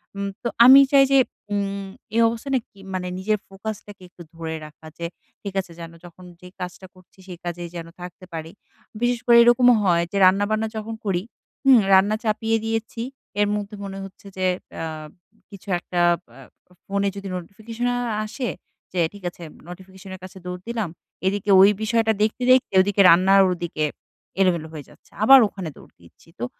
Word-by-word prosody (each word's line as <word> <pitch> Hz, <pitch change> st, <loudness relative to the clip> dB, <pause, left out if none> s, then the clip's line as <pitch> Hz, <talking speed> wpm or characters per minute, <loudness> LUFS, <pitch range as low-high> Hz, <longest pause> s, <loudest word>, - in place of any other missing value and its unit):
উম 200 Hz, 0 st, -3 dB
তো -, -, 0 dB, 0.2 s
আমি 265 Hz, +2 st, +10 dB
চাই 275 Hz, -1 st, +7 dB
যে 275 Hz, -, +6 dB, 0.3 s
উম 200 Hz, -1 st, -2 dB, 0.3 s
এই 230 Hz, -, +4 dB
অবস্থানে 235 Hz, +4 st, -1 dB
কি 200 Hz, -, -22 dB
মানে 180 Hz, -1 st, -3 dB
নিজের 210 Hz, +2 st, 0 dB
ফোকাস 200 Hz, +2 st, -6 dB
টাকে 205 Hz, -2 st, -13 dB
একটু 175 Hz, -, -16 dB
ধরে 165 Hz, -1 st, -5 dB
রাখা, 155 Hz, +1 st, -16 dB
যে 170 Hz, -, -5 dB, 0.4 s
ঠিক 200 Hz, -2 st, -6 dB
আছে 180 Hz, -, -17 dB
যেন 165 Hz, -1 st, -8 dB
যখন 175 Hz, +1 st, -14 dB, 0.2 s
যে 180 Hz, -, -11 dB
কাজটা 180 Hz, +1 st, -7 dB
করছি 185 Hz, +1 st, -22 dB
সেই 180 Hz, -2 st, -8 dB
কাজেই 175 Hz, 0 st, -5 dB
যেন 165 Hz, -1 st, -6 dB
থাকতে 180 Hz, +1 st, -10 dB
পারি। 160 Hz, 0 st, -6 dB, 0.5 s
বিশেষ 245 Hz, 0 st, +1 dB
করে 235 Hz, -1 st, +6 dB
এরকমও 240 Hz, +1 st, +5 dB
হয়, 170 Hz, -3 st, +3 dB
যে 200 Hz, -, -2 dB
রান্না-বান্না 205 Hz, +4 st, +2 dB
যখন 220 Hz, +1 st, -5 dB
করি, 185 Hz, -3 st, -1 dB, 0.4 s
হুম 270 Hz, -2 st, +7 dB, 0.2 s
রান্না 195 Hz, +3 st, +5 dB
চাপিয়ে 225 Hz, +1 st, 0 dB
দিয়েছি। 225 Hz, +1 st, -3 dB, 0.4 s
এর 205 Hz, -, +3 dB
মধ্যে 205 Hz, 0 st, -5 dB
মনে 195 Hz, 0 st, -7 dB
হচ্ছে 195 Hz, +1 st, -14 dB
যে 185 Hz, -, -1 dB, 0.3 s
অ্যা 165 Hz, -, -4 dB, 0.6 s
কিছু 200 Hz, -1 st, -14 dB
একটা 175 Hz, 0 st, -4 dB, 0.3 s
অ্যা 135 Hz, +3 st, -14 dB, 0.4 s
ফোনে 200 Hz, 0 st, -1 dB
যদি 200 Hz, 0 st, -7 dB
নোটিফিকেশন 220 Hz, +7 st, -5 dB, 0.4 s
আসে 245 Hz, +3 st, -4 dB, 0.4 s
যে 180 Hz, -, -1 dB
ঠিক 205 Hz, -2 st, -13 dB
আছে 175 Hz, -, -14 dB, 0.3 s
নোটিফিকেশন 190 Hz, +1 st, -12 dB
এর -, -, -14 dB
কাছে 185 Hz, 0 st, -11 dB
দৌড় 180 Hz, 0 st, -6 dB
দিলাম। 225 Hz, -6 st, -2 dB, 0.4 s
এদিকে 200 Hz, +1 st, -2 dB
ওই 195 Hz, -, +8 dB
বিষয়টা 225 Hz, 0 st, +2 dB
দেখতে, 220 Hz, +4 st, 0 dB
দেখতে 255 Hz, -4 st, +3 dB
ওদিকে 200 Hz, +1 st, +2 dB
রান্না 185 Hz, +3 st, +5 dB, 0.2 s
ওদিকে 175 Hz, -3 st, -3 dB, 0.6 s
এলোমেলো 170 Hz, -4 st, +1 dB
হয়ে 150 Hz, -3 st, -8 dB
যাচ্ছে। -, -, -22 dB
আবার 270 Hz, +4 st, +9 dB
ওখানে 190 Hz, -4 st, -7 dB
দৌড় -, -, -17 dB
দিচ্ছি। 85 Hz, -, -21 dB
তো 120 Hz, -, -2 dB
195 Hz, 175 wpm, -22 LUFS, 180-220 Hz, 0.6 s, আমি